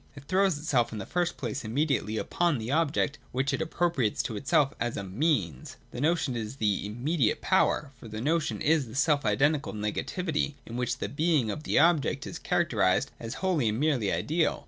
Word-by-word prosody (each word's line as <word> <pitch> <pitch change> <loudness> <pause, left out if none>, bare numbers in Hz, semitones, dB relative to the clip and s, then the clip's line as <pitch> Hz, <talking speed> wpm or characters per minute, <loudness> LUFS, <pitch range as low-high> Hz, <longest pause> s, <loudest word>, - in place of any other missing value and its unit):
It 145 - -11
throws 190 +1 +2
itself 145 -6 +1
in 110 - -5
the 95 - -5
first 175 -1 -1
place 135 0 -4
immediately 115 -2 0
upon 170 +5 +1
the 115 +2 -4
object, 150 -1 +1
which 135 +3 0
it 135 - -1
appropriates 160 -8 0
to 110 - -4
itself 140 +4 +2
as 120 0 -2
a 100 - -3
Means. 95 - -1
The 120 - -5
notion 155 -4 +1
is 110 +1 -4
this 105 -6 0
immediate 120 +5 0
power; 145 -2 +2
for 115 - -10
the 110 0 -6
notion 155 +5 0
is 155 -3 +3
the 115 - -10
self 145 0 +2
identical 145 +8 +2
negativity, 145 - -2
in 115 - -8
which 125 0 -1
the - - -3
being 150 -6 +1
of 155 - -6
the - - +1
object 155 -2 +3
is 165 - -6
characterised 115 - +1
as 115 -1 -6
wholly 155 -12 +2
and 110 +2 -2
merely 135 -9 +1
ideal. 160 0 0
140 Hz, 190 wpm, -28 LUFS, 115-160 Hz, -, is